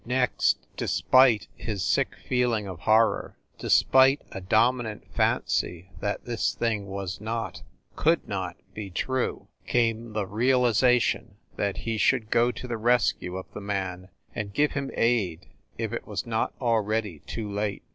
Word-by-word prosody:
Next, 125 Hz, +1 st, +2 dB, 0.2 s
despite 130 Hz, -4 st, +4 dB
his 105 Hz, -5 st, -4 dB
sick -, -, +1 dB
feeling 120 Hz, -4 st, +1 dB
of 90 Hz, -4 st, -7 dB
horror, 110 Hz, +7 st, +2 dB, 0.2 s
despite 135 Hz, +2 st, +5 dB
a 95 Hz, -, -6 dB
dominant 110 Hz, +3 st, +1 dB
fancy 90 Hz, +2 st, 0 dB
that 105 Hz, -, -3 dB
this 120 Hz, -2 st, -1 dB
thing 110 Hz, -4 st, -1 dB
was 95 Hz, -1 st, -5 dB
not, 115 Hz, +1 st, -4 dB, 0.3 s
could -, -, +2 dB
not -, -, -3 dB, 0.2 s
be 105 Hz, -2 st, -6 dB
true, 130 Hz, +8 st, -2 dB, 0.2 s
came 115 Hz, -1 st, 0 dB
the 105 Hz, -2 st, -1 dB
realization 125 Hz, +2 st, +2 dB, 0.2 s
that 100 Hz, -1 st, -1 dB
he 115 Hz, -1 st, -3 dB
should 115 Hz, -4 st, +2 dB
go 120 Hz, +1 st, +4 dB
to 125 Hz, -, -8 dB
the 115 Hz, -2 st, -3 dB
rescue 110 Hz, -6 st, +1 dB
of 95 Hz, -, -6 dB
the -, -, -6 dB
man, 95 Hz, -2 st, -3 dB, 0.2 s
and 105 Hz, -2 st, -5 dB
give 150 Hz, 0 st, +3 dB
him 140 Hz, -1 st, -3 dB
aid, 105 Hz, -9 st, +1 dB, 0.3 s
if 115 Hz, -1 st, -3 dB
it 115 Hz, -, -5 dB
was 100 Hz, -4 st, -3 dB
not 115 Hz, -1 st, -1 dB
already 110 Hz, -, 0 dB
too 110 Hz, -2 st, -4 dB
late. 100 Hz, 0 st, -2 dB
110 Hz, 145 wpm, -26 LUFS, 100-120 Hz, 0.3 s, despite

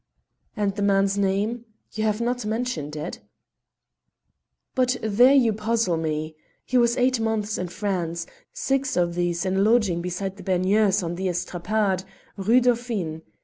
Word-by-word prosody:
"And 200 Hz, -2 st, 0 dB
the 205 Hz, -, -3 dB
man's 195 Hz, -1 st, +2 dB
name? 200 Hz, +4 st, 0 dB, 0.3 s
you 220 Hz, -, -2 dB
have 215 Hz, 0 st, +1 dB
not 245 Hz, +1 st, -1 dB
mentioned 210 Hz, -, -3 dB
it." 155 Hz, +3 st, -5 dB, 1.5 s
"But 250 Hz, -1 st, +1 dB
there 240 Hz, +6 st, +5 dB
you 240 Hz, -5 st, +4 dB
puzzle 220 Hz, -3 st, 0 dB
me. 155 Hz, -1 st, -3 dB, 0.3 s
He 255 Hz, -, -4 dB
was 240 Hz, 0 st, +4 dB
eight 255 Hz, -1 st, +2 dB
months 220 Hz, -1 st, -1 dB
in 180 Hz, -, -2 dB
France, 175 Hz, -3 st, -3 dB, 0.3 s
six 270 Hz, -5 st, -1 dB
of 175 Hz, -1 st, +1 dB
these 175 Hz, 0 st, -1 dB
in 190 Hz, 0 st, 0 dB
a -, -, +3 dB
lodging 210 Hz, -5 st, +3 dB
beside 185 Hz, +2 st, -4 dB
the -, -, -10 dB
Baigneurs 195 Hz, +2 st, +2 dB
on 170 Hz, 0 st, -3 dB
the 190 Hz, +2 st, -2 dB
Estrapade, 185 Hz, +2 st, -1 dB, 0.3 s
Rue 225 Hz, +6 st, +3 dB
Dauphine. 230 Hz, -10 st, -1 dB
200 Hz, 150 wpm, -24 LUFS, 180-230 Hz, 1.5 s, there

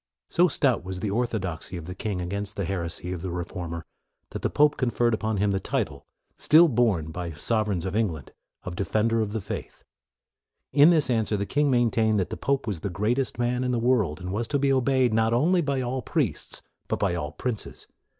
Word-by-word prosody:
So 175 Hz, +1 st, +5 dB
stout 135 Hz, -, +1 dB
was 95 Hz, 0 st, -5 dB
the 105 Hz, -, -1 dB
orthodoxy 95 Hz, -7 st, -2 dB
of 85 Hz, -, -7 dB
the 90 Hz, -, -6 dB
king 95 Hz, -1 st, -3 dB
against 100 Hz, +3 st, -4 dB
the 100 Hz, -, -2 dB
heresy 90 Hz, -1 st, -3 dB
of 90 Hz, -, -6 dB
the 95 Hz, -, -4 dB
re 85 Hz, 0 st, -3 dB
former, 85 Hz, -2 st, -6 dB, 0.5 s
that -, -, -5 dB
the -, -, 0 dB
pope 150 Hz, 0 st, +4 dB
conferred 120 Hz, -2 st, +1 dB
upon 110 Hz, -1 st, -1 dB
him 100 Hz, +1 st, +2 dB
the 95 Hz, -, 0 dB
title, -, -, -3 dB, 0.3 s
still 165 Hz, +3 st, +6 dB
borne 110 Hz, -, +1 dB
by 85 Hz, 0 st, -5 dB
sovereigns 105 Hz, +2 st, -1 dB
of 95 Hz, +1 st, -3 dB
Eng 110 Hz, 0 st, +3 dB
land, 80 Hz, -7 st, -8 dB, 0.3 s
of 90 Hz, -, -6 dB
Defender 110 Hz, +4 st, +1 dB
of 105 Hz, -2 st, -2 dB
the 110 Hz, -, -2 dB
Faith. 95 Hz, -, -7 dB, 0.9 s
In 145 Hz, +3 st, +7 dB
this 155 Hz, -7 st, +3 dB
answer 110 Hz, -2 st, +1 dB
the 100 Hz, -, -2 dB
king 145 Hz, +6 st, +1 dB
maintained 115 Hz, -4 st, +2 dB
that 95 Hz, -, -2 dB
the -, -, -2 dB
pope 140 Hz, 0 st, -1 dB
was 100 Hz, -7 st, -3 dB
the 100 Hz, -, -3 dB
greatest 110 Hz, +9 st, -1 dB
man 125 Hz, +1 st, 0 dB
in 125 Hz, -, -1 dB
the 125 Hz, -, +1 dB
world, 115 Hz, -10 st, +1 dB
and 90 Hz, +1 st, -5 dB
was 115 Hz, +3 st, -2 dB
to 145 Hz, -, 0 dB
be 140 Hz, 0 st, +2 dB
obeyed, 130 Hz, -2 st, +2 dB
not 110 Hz, +1 st, +2 dB
only 175 Hz, +8 st, +3 dB
by 140 Hz, -4 st, -1 dB
all 130 Hz, +1 st, -2 dB
priests, -, -, -2 dB, 0.2 s
but -, -, -1 dB
by 95 Hz, -3 st, 0 dB
all 75 Hz, -4 st, -3 dB
princes. 115 Hz, +6 st, -5 dB
110 Hz, 215 wpm, -26 LUFS, 90-125 Hz, 0.9 s, In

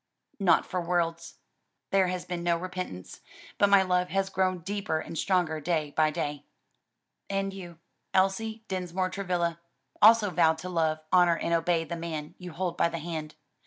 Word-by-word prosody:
"Not 195 Hz, -3 st, +4 dB
for 185 Hz, -1 st, -3 dB
worlds: 170 Hz, -1 st, -1 dB, 0.6 s
there 195 Hz, -1 st, +4 dB
has 180 Hz, 0 st, -3 dB
been 175 Hz, -1 st, -4 dB
no 170 Hz, -1 st, +2 dB
repentance, 180 Hz, -, -6 dB, 0.4 s
but 205 Hz, -, +5 dB
my 200 Hz, -1 st, +6 dB
love 180 Hz, -1 st, +1 dB
has 195 Hz, 0 st, -1 dB
grown 185 Hz, -2 st, 0 dB
deeper 200 Hz, -3 st, -2 dB
and 160 Hz, -, -7 dB
stronger 175 Hz, -3 st, +1 dB
day 155 Hz, -2 st, -1 dB
by 155 Hz, +1 st, +3 dB
day." 145 Hz, -2 st, -4 dB, 0.8 s
"And 195 Hz, 0 st, -1 dB
you, 175 Hz, -4 st, -9 dB, 0.3 s
Elsie 220 Hz, +4 st, +1 dB
Dinsmore 185 Hz, 0 st, -2 dB
Travilla, 175 Hz, -4 st, -1 dB, 0.4 s
also 215 Hz, -2 st, +7 dB
vowed 160 Hz, -2 st, +3 dB
to 180 Hz, +3 st, -6 dB
love, 160 Hz, -3 st, 0 dB
honor 175 Hz, -2 st, +5 dB
and 170 Hz, -, -1 dB
obey 165 Hz, 0 st, +2 dB
the 170 Hz, +1 st, -5 dB
man 160 Hz, -3 st, -5 dB
you 180 Hz, -1 st, -8 dB
hold 175 Hz, +1 st, -3 dB
by -, -, +3 dB
the 165 Hz, -, -4 dB
hand. 160 Hz, -2 st, -5 dB
175 Hz, 165 wpm, -28 LUFS, 165-190 Hz, 0.8 s, also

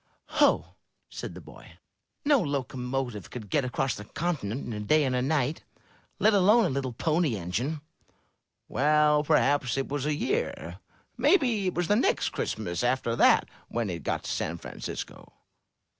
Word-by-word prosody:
"Ho!" -, -, +3 dB, 0.3 s
said -, -, -6 dB
the -, -, -9 dB
boy. -, -, -14 dB, 0.5 s
"No 285 Hz, -2 st, +5 dB
locomotive 130 Hz, -, -3 dB
could 110 Hz, -5 st, -8 dB
get 145 Hz, -, +2 dB
across 130 Hz, 0 st, -1 dB
the 105 Hz, -, -7 dB
continent 140 Hz, -, -3 dB
in 120 Hz, -, -5 dB
a 105 Hz, -, -4 dB
day 150 Hz, +9 st, +3 dB
and 130 Hz, -2 st, 0 dB
a 125 Hz, -, +1 dB
night, 140 Hz, +1 st, 0 dB, 0.5 s
let 220 Hz, -, +4 dB
alone 205 Hz, +4 st, +5 dB
a -, -, +1 dB
little 135 Hz, -1 st, -2 dB
Pony 155 Hz, +1 st, 0 dB
Engine." 115 Hz, -, -3 dB, 0.9 s
"Well, 150 Hz, +1 st, +3 dB
perhaps 145 Hz, -4 st, +2 dB
it 135 Hz, -, -2 dB
was 145 Hz, 0 st, -2 dB
a 150 Hz, -, +1 dB
year. 430 Hz, -, -2 dB, 0.4 s
Maybe 240 Hz, -, +3 dB
it 185 Hz, -, -2 dB
was 175 Hz, -1 st, 0 dB
the 205 Hz, -, +3 dB
next 390 Hz, -, +2 dB
Christmas 95 Hz, -2 st, -3 dB
after 120 Hz, -2 st, +1 dB
that -, -, +5 dB, 0.2 s
when 115 Hz, -4 st, -2 dB
it 85 Hz, -1 st, -5 dB
got -, -, -2 dB
to -, -, -4 dB
San -, -, -2 dB
Francisco." -, -, -7 dB
140 Hz, 160 wpm, -28 LUFS, 120-165 Hz, 0.9 s, No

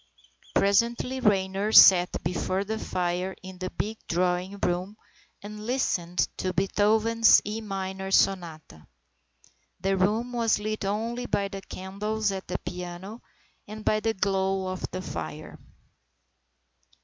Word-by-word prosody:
Presently 235 Hz, +5 st, +2 dB
Raynor 195 Hz, -1 st, +1 dB
sat 180 Hz, -4 st, +7 dB
before 180 Hz, +3 st, -1 dB
the 220 Hz, +2 st, -4 dB
fire 180 Hz, 0 st, -2 dB
in 185 Hz, -1 st, -10 dB
the 185 Hz, 0 st, -3 dB
big 220 Hz, +3 st, -4 dB
drawing 180 Hz, +3 st, 0 dB
room 185 Hz, +3 st, -2 dB, 0.5 s
and 210 Hz, +1 st, -8 dB
listened 180 Hz, -9 st, 0 dB
to 185 Hz, -1 st, -2 dB
Beethoven's 215 Hz, +4 st, +4 dB
E 215 Hz, +2 st, -4 dB
Minor 190 Hz, -2 st, -4 dB
Sonata. 165 Hz, -, 0 dB, 0.9 s
The 195 Hz, +2 st, 0 dB
room 215 Hz, +6 st, +1 dB
was 230 Hz, -2 st, +2 dB
lit 215 Hz, 0 st, -3 dB
only 230 Hz, +5 st, -2 dB
by 200 Hz, -1 st, 0 dB
the 195 Hz, -1 st, -7 dB
candles 205 Hz, +3 st, -3 dB
at 190 Hz, -1 st, -6 dB
the 180 Hz, -, -2 dB
piano 180 Hz, +5 st, -7 dB, 0.5 s
and 215 Hz, +1 st, -9 dB
by 215 Hz, -, +2 dB
the 225 Hz, +1 st, -1 dB
glow 190 Hz, -1 st, 0 dB
of 185 Hz, -1 st, -4 dB
the 185 Hz, 0 st, -5 dB
fire. 80 Hz, -, -7 dB
195 Hz, 125 wpm, -27 LUFS, 185-215 Hz, 0.9 s, sat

